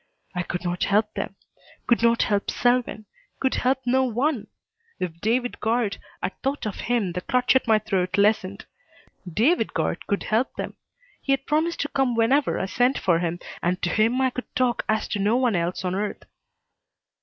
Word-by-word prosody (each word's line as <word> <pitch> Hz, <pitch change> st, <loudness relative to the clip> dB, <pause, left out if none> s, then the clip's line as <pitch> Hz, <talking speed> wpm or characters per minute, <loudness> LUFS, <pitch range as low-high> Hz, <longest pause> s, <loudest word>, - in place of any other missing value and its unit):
I 180 Hz, -, -1 dB
could 175 Hz, +1 st, -4 dB
not 175 Hz, 0 st, -1 dB
help 210 Hz, +1 st, +2 dB
them. -, -, -4 dB, 0.5 s
Could 235 Hz, -, +3 dB
not 235 Hz, 0 st, +4 dB
help 205 Hz, -1 st, 0 dB
Selwyn. 245 Hz, -3 st, +1 dB, 0.3 s
Could 265 Hz, -, +1 dB
help 260 Hz, +1 st, +1 dB
no 260 Hz, +2 st, +3 dB
one! 255 Hz, +1 st, 0 dB, 0.5 s
If 170 Hz, -2 st, -4 dB
David 245 Hz, +3 st, 0 dB
Guard 225 Hz, -2 st, 0 dB, 0.3 s
at -, -, -4 dB
thought 275 Hz, -1 st, -2 dB
of 210 Hz, -, -4 dB
him 230 Hz, -7 st, +1 dB
the 180 Hz, +1 st, -4 dB
clutch 250 Hz, +5 st, +2 dB
at 260 Hz, -, +3 dB
my 220 Hz, -1 st, +5 dB
throat 195 Hz, -4 st, -1 dB
lessened. 200 Hz, -1 st, +2 dB, 0.7 s
David 255 Hz, -, +2 dB
Guard -, -, -1 dB
could 200 Hz, -, 0 dB
help 225 Hz, +4 st, 0 dB
them. -, -, -5 dB, 0.5 s
He 275 Hz, -, +1 dB
had 270 Hz, -, -1 dB
promised 320 Hz, +3 st, 0 dB
to 290 Hz, -, -1 dB
come 270 Hz, -4 st, 0 dB
whenever 245 Hz, +5 st, +2 dB
I -, -, -1 dB
sent 245 Hz, +7 st, +2 dB
for 170 Hz, -3 st, +2 dB
him, 170 Hz, 0 st, -1 dB, 0.2 s
and 180 Hz, +1 st, 0 dB
to 175 Hz, -, +1 dB
him 225 Hz, +4 st, +2 dB
I 260 Hz, -1 st, +2 dB
could 250 Hz, -, -7 dB
talk 250 Hz, -2 st, +1 dB
as 215 Hz, 0 st, +1 dB
to 205 Hz, -, -2 dB
no 210 Hz, +4 st, +2 dB
one 250 Hz, -5 st, +2 dB
else 175 Hz, +2 st, -1 dB
on 180 Hz, -, 0 dB
earth. 205 Hz, +2 st, -3 dB
225 Hz, 190 wpm, -24 LUFS, 195-255 Hz, 0.7 s, my